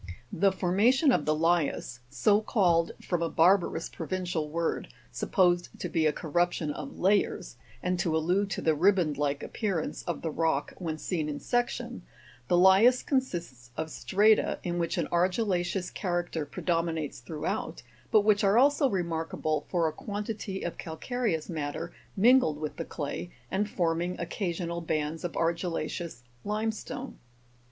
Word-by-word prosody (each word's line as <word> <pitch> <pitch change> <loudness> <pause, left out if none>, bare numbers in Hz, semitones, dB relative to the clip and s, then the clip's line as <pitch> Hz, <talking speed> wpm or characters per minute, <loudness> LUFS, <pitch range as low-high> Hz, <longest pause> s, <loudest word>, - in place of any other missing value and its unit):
34. - - -7
The 195 +1 +5
formation 220 - +3
of 150 - +1
the 155 - +2
LIAS 160 -6 0
so 205 - +3
called 175 -7 +2
from 175 -2 -1
a 165 - 0
barbarous 175 0 +3
pro 165 - -7
vincial 175 -5 -2
word, 165 +1 -1 0.2
supposed 175 -3 +2
to - - -3
be 160 -2 +2
a - - +3
corruption 170 0 0
of 145 -1 -7
layers, 200 +2 +1 0.3
and 180 0 0
to 160 -2 +1
allude 180 +5 +1
to - - -3
the 160 - +4
riband 170 -3 +2
like 145 -1 0
appearance 195 -8 -2
of 175 - -3
the 160 - -1
rock 160 -3 0
when 160 -4 -3
seen 155 -2 -2
in 145 - -4
section 245 +1 -2 0.5
the 175 - +3
Lias 195 +8 +6
consists 170 - -2
of 160 0 -3
strata, 210 +6 +3
in 175 -1 -2
which 170 -1 -1
an - - +1
argilla'ceous 180 0 0
character 175 -4 -2
pre - - -8
dominates 165 -5 -1
throughout, 150 -1 -4 0.3
but 215 - +5
which 210 0 +3
are 200 +2 +4
also 280 +1 +4
remarkable 165 -4 -2
for 170 -3 +2
a 155 - -2
quan 205 +4 -5
tity 205 -3 -5
of 175 - -5
calcareous 175 0 -2
matter 145 -4 -4 0.2
mingled 225 - +5
with 155 0 -5
the 165 - -3
clay, 145 +3 -5 0.2
and 205 +2 0
forming 175 0 -1
occasional 170 -1 -3
bands 155 0 -2
of 175 - -3
argilla'ceous 170 -3 -2 0.2
limestone. 220 +4 -3
175 Hz, 155 wpm, -29 LUFS, 160-195 Hz, 0.5 s, Lias